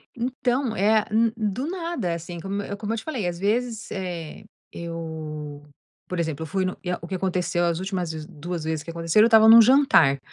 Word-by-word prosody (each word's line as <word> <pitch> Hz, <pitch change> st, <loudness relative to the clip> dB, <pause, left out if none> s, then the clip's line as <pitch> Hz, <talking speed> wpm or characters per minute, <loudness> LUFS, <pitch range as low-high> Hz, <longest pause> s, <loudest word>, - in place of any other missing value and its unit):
Então 250 Hz, 0 st, -1 dB
é 215 Hz, +2 st, +3 dB
n 225 Hz, +1 st, +3 dB
do 220 Hz, +5 st, -2 dB
nada, 335 Hz, -, -3 dB
assim, 170 Hz, +1 st, -6 dB
como 195 Hz, +3 st, -3 dB
eu 200 Hz, -, -6 dB
como 215 Hz, +1 st, -3 dB
eu -, -, -2 dB
te 220 Hz, -, -6 dB
falei, 250 Hz, -, -3 dB
às 170 Hz, -1 st, -3 dB
vezes, 225 Hz, +2 st, -1 dB
eh, 180 Hz, -1 st, -6 dB, 0.3 s
eu 155 Hz, -3 st, -7 dB, 0.5 s
por 180 Hz, -1 st, -3 dB
exemplo, 160 Hz, -1 st, -3 dB
eu -, -, -6 dB
fui 190 Hz, +2 st, -1 dB
no 185 Hz, -, -3 dB
e 180 Hz, -, -2 dB
o 170 Hz, -, -8 dB
que 190 Hz, -, -3 dB
aconteceu 180 Hz, -2 st, 0 dB
as 170 Hz, 0 st, 0 dB
últimas 185 Hz, -3 st, -3 dB
2 170 Hz, +1 st, -6 dB
vezes 160 Hz, -1 st, -2 dB
que 165 Hz, -, -10 dB
aconteceram, 165 Hz, +6 st, +3 dB
eu -, -, +5 dB
estava 220 Hz, -1 st, +6 dB
num 230 Hz, 0 st, +10 dB
jantar, 250 Hz, -, +5 dB
190 Hz, 205 wpm, -24 LUFS, 165-225 Hz, 0.5 s, num